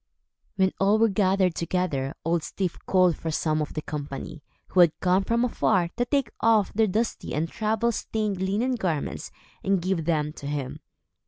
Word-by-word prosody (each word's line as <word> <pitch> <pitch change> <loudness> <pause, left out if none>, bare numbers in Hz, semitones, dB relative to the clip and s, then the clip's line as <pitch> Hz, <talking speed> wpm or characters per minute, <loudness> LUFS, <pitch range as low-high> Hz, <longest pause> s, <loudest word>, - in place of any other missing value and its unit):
When 190 -1 +2
all 200 +2 +4
were 225 0 +4
gathered 190 -2 +2
together, 165 -6 -2
Old 170 0 +1
Styf 185 +2 -3
called 185 -3 +4
for 165 - -5
some 155 0 0
of 150 - -5
the 155 - -3
company, 145 +1 -6 0.3
who 185 - +1
had 170 -3 +5
come 185 +1 +2
from 235 +4 +1
afar, 190 -7 +1
to 245 - 0
take 275 0 0
off 220 -3 +3
their 220 +1 +3
dusty 220 +4 -2
and 155 +2 0
travel 220 +4 0
stained 210 -4 -2
linen 210 +7 0
garments 180 - -2 0.3
and 195 -1 +2
give 175 -2 -1
them 150 -2 0
to 140 - -8
him. 145 -3 -4
185 Hz, 175 wpm, -26 LUFS, 160-215 Hz, 0.3 s, had